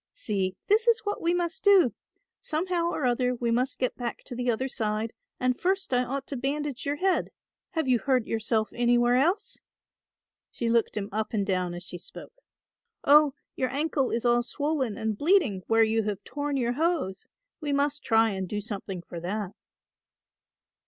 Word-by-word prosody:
"See 195 Hz, -, -1 dB
this 440 Hz, +3 st, +3 dB
is 465 Hz, -1 st, +4 dB
what 410 Hz, -1 st, -3 dB
we 335 Hz, -, +2 dB
must 350 Hz, 0 st, -1 dB
do. 390 Hz, -, +6 dB, 0.5 s
Somehow 340 Hz, +2 st, -1 dB
or 290 Hz, -, -2 dB
other 250 Hz, 0 st, +1 dB
we 235 Hz, -1 st, -1 dB
must 250 Hz, +3 st, 0 dB
get 255 Hz, -, -1 dB
back 240 Hz, -2 st, -5 dB
to 255 Hz, -, -7 dB
the 245 Hz, 0 st, -1 dB
other 240 Hz, +3 st, 0 dB
side 220 Hz, -3 st, -2 dB, 0.3 s
and 255 Hz, 0 st, +1 dB
first 385 Hz, -4 st, 0 dB
I 250 Hz, 0 st, +3 dB
ought 270 Hz, +2 st, -4 dB
to 280 Hz, -, -5 dB
bandage 280 Hz, +1 st, -3 dB
your 285 Hz, -, +1 dB
head. 370 Hz, +4 st, +1 dB, 0.4 s
Have 320 Hz, -5 st, 0 dB
you 250 Hz, -2 st, +4 dB
hurt 255 Hz, -3 st, +1 dB
yourself 220 Hz, 0 st, 0 dB
anywhere 240 Hz, 0 st, +3 dB
else?" 360 Hz, -, +1 dB, 0.9 s
She 230 Hz, -1 st, -2 dB
looked 230 Hz, -2 st, +1 dB
him 200 Hz, -1 st, -2 dB
up 215 Hz, +2 st, -2 dB
and 205 Hz, -2 st, +1 dB
down 180 Hz, -2 st, -1 dB
as 175 Hz, -, -5 dB
she 175 Hz, 0 st, -6 dB
spoke. -, -, -9 dB, 0.7 s
"Oh, 295 Hz, -1 st, +6 dB, 0.2 s
your 255 Hz, -, 0 dB
ankle 280 Hz, 0 st, 0 dB
is 235 Hz, +1 st, -2 dB
all 240 Hz, 0 st, +4 dB
swollen 270 Hz, -3 st, -1 dB
and 220 Hz, -2 st, -2 dB
bleeding 295 Hz, -, +3 dB
where 225 Hz, 0 st, +5 dB
you 225 Hz, 0 st, +2 dB
have 205 Hz, -2 st, -3 dB
torn 290 Hz, -1 st, -3 dB
your 240 Hz, -2 st, 0 dB
hose; 310 Hz, -, -1 dB, 0.3 s
we 300 Hz, -3 st, -3 dB
must 285 Hz, +1 st, +1 dB
try 225 Hz, -1 st, +4 dB
and 190 Hz, -2 st, -4 dB
do 210 Hz, -, -2 dB
something 200 Hz, -4 st, -5 dB
for 170 Hz, -, -8 dB
that." 195 Hz, +3 st, -3 dB
250 Hz, 180 wpm, -27 LUFS, 220-295 Hz, 0.9 s, do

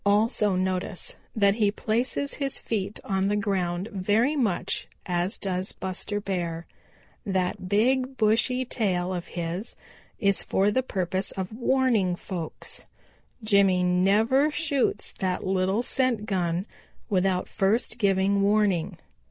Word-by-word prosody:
Also 205 Hz, -1 st, +3 dB
notice 185 Hz, 0 st, -2 dB, 0.2 s
that 200 Hz, -2 st, +4 dB
he 210 Hz, -1 st, +2 dB
places 240 Hz, +7 st, -1 dB
his 275 Hz, -2 st, -1 dB
feet 205 Hz, -2 st, -3 dB
on 195 Hz, -1 st, 0 dB
the 205 Hz, -, +1 dB
ground 190 Hz, -3 st, -1 dB
very 210 Hz, +9 st, +1 dB
much 225 Hz, -11 st, -1 dB, 0.2 s
as 180 Hz, +3 st, -1 dB
does 190 Hz, -1 st, -2 dB
Buster 190 Hz, +2 st, -3 dB
Bear. 170 Hz, -4 st, -3 dB, 0.6 s
That 190 Hz, -2 st, -2 dB
big, 255 Hz, +5 st, +2 dB
bushy 235 Hz, +4 st, +2 dB
tail 185 Hz, -7 st, -1 dB
of 175 Hz, -1 st, -4 dB
his 175 Hz, +5 st, -4 dB, 0.4 s
is 200 Hz, -1 st, +2 dB
for 200 Hz, +2 st, +1 dB
the 260 Hz, -, +2 dB
purpose 190 Hz, -5 st, -2 dB
of 190 Hz, +2 st, -4 dB
warning 235 Hz, -7 st, +2 dB
folks. 175 Hz, -3 st, -7 dB, 0.6 s
Jimmy 200 Hz, -4 st, +4 dB
never 205 Hz, +10 st, +3 dB
shoots 285 Hz, -8 st, 0 dB
that 185 Hz, -1 st, -1 dB
little 190 Hz, +4 st, +1 dB
scent 250 Hz, -5 st, 0 dB
gun 180 Hz, -3 st, -1 dB, 0.5 s
without 185 Hz, -1 st, +1 dB
first 210 Hz, +5 st, 0 dB
giving 200 Hz, -1 st, +2 dB
warning. 200 Hz, -4 st, +2 dB
200 Hz, 125 wpm, -26 LUFS, 185-220 Hz, 0.6 s, that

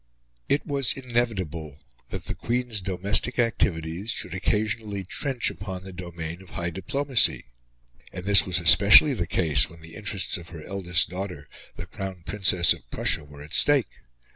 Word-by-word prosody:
It 140 Hz, -, 0 dB
was 140 Hz, -3 st, -1 dB
inevitable 95 Hz, -, -4 dB, 0.3 s
that -, -, -6 dB
the -, -, -4 dB
Queen's 120 Hz, -3 st, -2 dB
domestic 100 Hz, +6 st, -2 dB
activities 95 Hz, -5 st, -1 dB
should -, -, -3 dB
occasionally 105 Hz, +1 st, -2 dB
trench 125 Hz, -, -1 dB
upon 95 Hz, -2 st, -8 dB
the 95 Hz, 0 st, -10 dB
domain 85 Hz, -1 st, -8 dB
of 95 Hz, -, -16 dB
high 85 Hz, +1 st, -5 dB
diplomacy; 125 Hz, -, +2 dB, 0.7 s
and 90 Hz, 0 st, -8 dB
this 100 Hz, -3 st, +7 dB
was 90 Hz, -2 st, 0 dB
especially 85 Hz, -, +7 dB
the -, -, -3 dB
case 75 Hz, -7 st, +2 dB
when 85 Hz, 0 st, -16 dB
the 80 Hz, 0 st, -14 dB
interests 100 Hz, -1 st, -2 dB
of 85 Hz, -1 st, -13 dB
her 80 Hz, -3 st, -11 dB
eldest 90 Hz, -2 st, 0 dB
daughter, 90 Hz, -6 st, -7 dB, 0.3 s
the 85 Hz, -, -8 dB
Crown 95 Hz, -1 st, -8 dB
Princess 95 Hz, -4 st, +4 dB
of -, -, -16 dB
Prussia, 75 Hz, -, +1 dB
were 70 Hz, 0 st, -14 dB
at 75 Hz, -, -12 dB
stake. 145 Hz, -4 st, +2 dB
95 Hz, 160 wpm, -24 LUFS, 85-110 Hz, 0.7 s, this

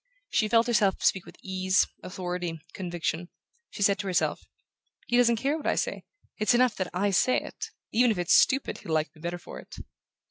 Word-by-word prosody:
She 215 Hz, -, +2 dB
felt 230 Hz, +1 st, +4 dB
herself 210 Hz, -5 st, +2 dB
speak 190 Hz, -, +2 dB
with -, -, -13 dB
ease, 185 Hz, 0 st, +2 dB, 0.2 s
authority, 180 Hz, -3 st, -4 dB
conviction. 175 Hz, -1 st, -3 dB, 0.4 s
She 200 Hz, -, -3 dB
said 200 Hz, 0 st, +3 dB
to 200 Hz, -, -3 dB
herself: 185 Hz, -, 0 dB, 0.6 s
"He 240 Hz, -, 0 dB
doesn't 240 Hz, -1 st, +5 dB
care 275 Hz, +6 st, 0 dB
what 310 Hz, -, -5 dB
I -, -, +2 dB
say -, -, -2 dB, 0.3 s
it's 215 Hz, +3 st, +3 dB
enough 245 Hz, -2 st, +3 dB
that 185 Hz, -2 st, -2 dB
I 200 Hz, +3 st, 0 dB
say 255 Hz, +7 st, +3 dB
it -, -, -7 dB, 0.2 s
even 245 Hz, +2 st, +4 dB
if 215 Hz, -, 0 dB
it's 175 Hz, -1 st, +2 dB
stupid 270 Hz, +1 st, +3 dB
he'll 160 Hz, -, -5 dB
like 155 Hz, +2 st, 0 dB
me 155 Hz, -, -17 dB
better 175 Hz, +1 st, -3 dB
for 175 Hz, -, -10 dB
it..." -, -, -12 dB
195 Hz, 200 wpm, -27 LUFS, 175-235 Hz, 0.6 s, doesn't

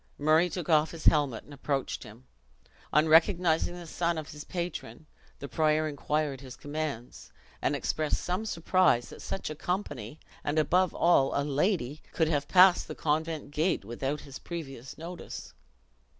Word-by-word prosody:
Murray 155 Hz, +4 st, +4 dB
took 175 Hz, -2 st, -5 dB
off 155 Hz, -2 st, +4 dB
his 165 Hz, -2 st, -9 dB
helmet, 145 Hz, -7 st, +3 dB
and 145 Hz, -, -14 dB
approached 140 Hz, -1 st, -2 dB
him. 65 Hz, -, -13 dB, 0.7 s
On 150 Hz, +2 st, +4 dB
recognizing 165 Hz, +1 st, +4 dB
the 175 Hz, -1 st, -8 dB
son 170 Hz, +1 st, -1 dB
of 155 Hz, 0 st, -6 dB
his 150 Hz, -1 st, -8 dB
patron, 170 Hz, -7 st, -5 dB, 0.3 s
the 140 Hz, -, -7 dB
prior 155 Hz, +1 st, +2 dB
inquired 150 Hz, -1 st, -2 dB
his 130 Hz, -3 st, -9 dB
commands; 145 Hz, -5 st, -5 dB, 0.3 s
and -, -, +1 dB
expressed 155 Hz, -1 st, -1 dB
some 185 Hz, +5 st, -2 dB
surprise 170 Hz, -, +2 dB
that -, -, -11 dB
such 190 Hz, -, -4 dB
a -, -, -5 dB
company, 150 Hz, -, -4 dB, 0.2 s
and 145 Hz, +2 st, -1 dB
above 180 Hz, +4 st, +3 dB
all, 140 Hz, -5 st, +3 dB
a -, -, +1 dB
lady, 150 Hz, -, 0 dB
could 160 Hz, -2 st, +2 dB
have 145 Hz, -3 st, 0 dB
passed 185 Hz, -1 st, +6 dB
the -, -, -6 dB
convent 155 Hz, -1 st, -1 dB
gate 155 Hz, -, 0 dB
without 135 Hz, +6 st, -3 dB
his 140 Hz, -2 st, -10 dB
previous 135 Hz, -7 st, -7 dB
notice. 170 Hz, +2 st, -8 dB
155 Hz, 160 wpm, -29 LUFS, 145-170 Hz, 0.7 s, passed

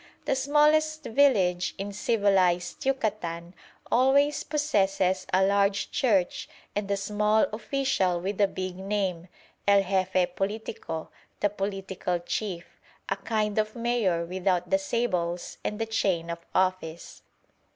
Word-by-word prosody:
The -, -, +1 dB
smallest 305 Hz, +3 st, +3 dB
village 205 Hz, -10 st, +2 dB
in 200 Hz, +1 st, -5 dB
civilised 195 Hz, -3 st, +1 dB
Yucatan 190 Hz, -10 st, -2 dB, 0.4 s
always 280 Hz, +4 st, +3 dB
possesses 195 Hz, -11 st, +1 dB
a 190 Hz, +1 st, +4 dB
large 200 Hz, 0 st, +1 dB
church 200 Hz, -8 st, +1 dB, 0.3 s
and 205 Hz, -1 st, -2 dB
a 200 Hz, -, +1 dB
small 210 Hz, +2 st, +2 dB
official 220 Hz, -7 st, 0 dB
with 195 Hz, +3 st, -2 dB
a 200 Hz, -, +5 dB
big 185 Hz, -1 st, -5 dB
name, 190 Hz, -3 st, -2 dB, 0.4 s
el 200 Hz, -1 st, +6 dB
Jefe 185 Hz, -1 st, 0 dB
politico, 195 Hz, -5 st, -4 dB, 0.3 s
"the 205 Hz, -, +2 dB
political 195 Hz, -3 st, -3 dB
Chief," 175 Hz, 0 st, -4 dB, 0.4 s
a 195 Hz, -, +1 dB
kind 210 Hz, +1 st, -1 dB
of 215 Hz, 0 st, -1 dB
mayor 230 Hz, -8 st, 0 dB
without 180 Hz, 0 st, -1 dB
the 190 Hz, -, +4 dB
sables 185 Hz, -5 st, -2 dB
and 210 Hz, -, -2 dB
the 225 Hz, -, -1 dB
chain 185 Hz, -6 st, 0 dB
of 170 Hz, -, -5 dB, 0.2 s
office. 185 Hz, -3 st, -1 dB
195 Hz, 125 wpm, -27 LUFS, 180-220 Hz, 0.4 s, el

